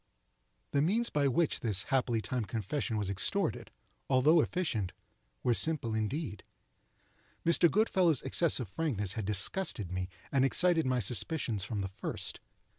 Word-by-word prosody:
The 140 Hz, -, +1 dB
means 220 Hz, +10 st, +1 dB
by 145 Hz, -2 st, +1 dB
which 155 Hz, +4 st, 0 dB
this 105 Hz, -4 st, +2 dB
happily 125 Hz, -4 st, 0 dB
timed 120 Hz, -5 st, -3 dB
confession 110 Hz, +4 st, -3 dB
was 105 Hz, -2 st, -2 dB
extorted, 95 Hz, -1 st, -1 dB, 0.4 s
although 145 Hz, +5 st, +4 dB
efficient, 125 Hz, -, -2 dB, 0.5 s
were 125 Hz, -, +2 dB
simple 140 Hz, -4 st, +3 dB
indeed. 110 Hz, +3 st, -3 dB, 1.0 s
Mr. 170 Hz, 0 st, +5 dB
Goodfellow's 185 Hz, -, +2 dB
excess 170 Hz, -5 st, +3 dB
of 125 Hz, -, -4 dB
frankness 110 Hz, -, -1 dB
had 110 Hz, -2 st, -4 dB
disgusted 105 Hz, -, +1 dB
me, 90 Hz, 0 st, -3 dB, 0.2 s
and 135 Hz, -2 st, +2 dB
excited 165 Hz, +2 st, +3 dB
my 130 Hz, -1 st, +1 dB
suspicions 120 Hz, -, -1 dB
from 100 Hz, +1 st, -4 dB
the 95 Hz, -, -3 dB
first. 95 Hz, +1 st, -4 dB
130 Hz, 140 wpm, -31 LUFS, 105-160 Hz, 1.0 s, Mr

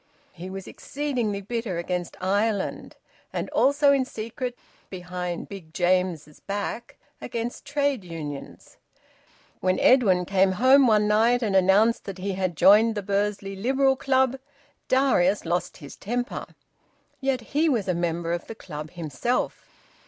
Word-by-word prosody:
He 180 Hz, +3 st, -9 dB
was 195 Hz, 0 st, -7 dB
exceedingly 250 Hz, -9 st, -3 dB
bitter 225 Hz, -3 st, -3 dB
against 175 Hz, 0 st, -3 dB
Ireland; 200 Hz, +2 st, -1 dB, 0.4 s
and -, -, -4 dB
also, 285 Hz, +1 st, +4 dB
in 275 Hz, -1 st, +2 dB
secret, 245 Hz, +1 st, -5 dB, 0.3 s
behind 180 Hz, -1 st, -5 dB
Big 175 Hz, -5 st, -11 dB
James's 175 Hz, -4 st, 0 dB
back, 205 Hz, +3 st, -5 dB, 0.2 s
against 235 Hz, +1 st, -5 dB
trade 285 Hz, -6 st, 0 dB
unions. 155 Hz, -5 st, -8 dB, 0.8 s
When 185 Hz, 0 st, +1 dB
Edwin 195 Hz, -9 st, +4 dB
came 190 Hz, 0 st, +2 dB
home 260 Hz, +6 st, +5 dB
one 210 Hz, -2 st, +3 dB
night 230 Hz, +4 st, +3 dB
and 205 Hz, -3 st, 0 dB
announced 195 Hz, +5 st, +4 dB
that 195 Hz, -2 st, -6 dB
he 195 Hz, +2 st, -3 dB
had 185 Hz, -3 st, -2 dB
joined 215 Hz, +6 st, +6 dB
the 205 Hz, -, -3 dB
Bursley 200 Hz, 0 st, -1 dB
Liberal 265 Hz, +6 st, +2 dB
Club, 265 Hz, -1 st, +1 dB, 0.5 s
Darius 210 Hz, -9 st, +2 dB
lost 175 Hz, +2 st, -2 dB
his 145 Hz, -5 st, -11 dB
temper. 245 Hz, +4 st, -3 dB, 0.7 s
Yet 270 Hz, -2 st, 0 dB
he 315 Hz, +3 st, +3 dB
was 230 Hz, -9 st, 0 dB
a 185 Hz, -, +1 dB
member 170 Hz, 0 st, -1 dB
of 175 Hz, -, -4 dB
the 225 Hz, -, -7 dB
club 150 Hz, -6 st, -8 dB
himself. 170 Hz, -, -3 dB
200 Hz, 135 wpm, -25 LUFS, 180-245 Hz, 0.8 s, joined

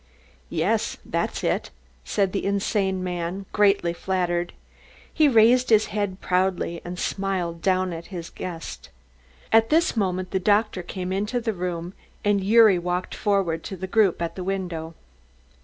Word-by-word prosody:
"Yes, 210 Hz, +7 st, 0 dB
that's -, -, -2 dB
it," -, -, 0 dB, 0.3 s
said 195 Hz, -3 st, 0 dB
the 195 Hz, -, -2 dB
insane 195 Hz, -1 st, 0 dB
man 180 Hz, +2 st, -3 dB
greatly 200 Hz, -4 st, +3 dB
flattered. 175 Hz, -1 st, -1 dB, 0.6 s
He 310 Hz, -2 st, +4 dB
raised 245 Hz, 0 st, +5 dB
his 220 Hz, -1 st, +5 dB
head 200 Hz, -3 st, -2 dB
proudly 180 Hz, -2 st, 0 dB
and 175 Hz, +1 st, -6 dB
smiled 185 Hz, -4 st, -2 dB
down 185 Hz, -1 st, +1 dB
at 165 Hz, 0 st, -7 dB
his 175 Hz, -3 st, -7 dB
guest. 170 Hz, -3 st, -7 dB, 0.6 s
At 225 Hz, 0 st, +5 dB
this 325 Hz, -1 st, +3 dB
moment 185 Hz, -3 st, -1 dB
the 190 Hz, -, +1 dB
doctor 205 Hz, 0 st, +2 dB
came 185 Hz, +1 st, -5 dB
into 210 Hz, +5 st, -1 dB
the 225 Hz, -2 st, -2 dB
room 175 Hz, -1 st, -4 dB, 0.3 s
and 205 Hz, -1 st, +3 dB
Gyuri 210 Hz, -1 st, +6 dB
walked 180 Hz, +1 st, -2 dB
forward 190 Hz, -6 st, 0 dB
to 190 Hz, -, -6 dB
the 185 Hz, -, -4 dB
group 190 Hz, -3 st, +2 dB
at 170 Hz, -, -3 dB
the 185 Hz, -, -6 dB
window. 175 Hz, -4 st, -4 dB
190 Hz, 150 wpm, -24 LUFS, 175-205 Hz, 0.6 s, Gyuri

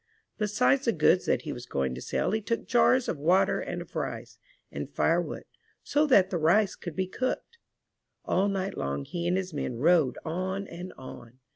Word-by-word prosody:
Besides 250 Hz, +6 st, +2 dB
the 230 Hz, -, +2 dB
goods 170 Hz, +2 st, +3 dB
that -, -, +1 dB
he -, -, -4 dB
was 125 Hz, 0 st, -9 dB
going 65 Hz, -2 st, -1 dB
to -, -, -7 dB
sell -, -, -1 dB
he 220 Hz, +1 st, 0 dB
took 230 Hz, +2 st, -2 dB
jars 250 Hz, +1 st, +3 dB
of 150 Hz, -, -2 dB
water 180 Hz, +6 st, +3 dB
and -, -, -4 dB
of -, -, -23 dB
rice, -, -, -5 dB, 0.3 s
and -, -, -5 dB
firewood, -, -, 0 dB, 0.4 s
so 295 Hz, +1 st, +2 dB
that 195 Hz, -9 st, +5 dB
the 175 Hz, -, 0 dB
rice 190 Hz, +6 st, +3 dB
could 175 Hz, -4 st, -8 dB
be 190 Hz, -, 0 dB
cooked. 255 Hz, -, -4 dB, 0.7 s
All 195 Hz, +2 st, +2 dB
night 195 Hz, 0 st, -2 dB
long 70 Hz, 0 st, -3 dB
he 170 Hz, 0 st, -3 dB
and 180 Hz, +2 st, +2 dB
his 185 Hz, -2 st, -4 dB
men 140 Hz, -4 st, -3 dB
rode 155 Hz, +2 st, +3 dB
on 185 Hz, +4 st, -3 dB
and 180 Hz, +2 st, -8 dB
on. 125 Hz, -2 st, -11 dB
185 Hz, 190 wpm, -28 LUFS, 155-210 Hz, 0.7 s, that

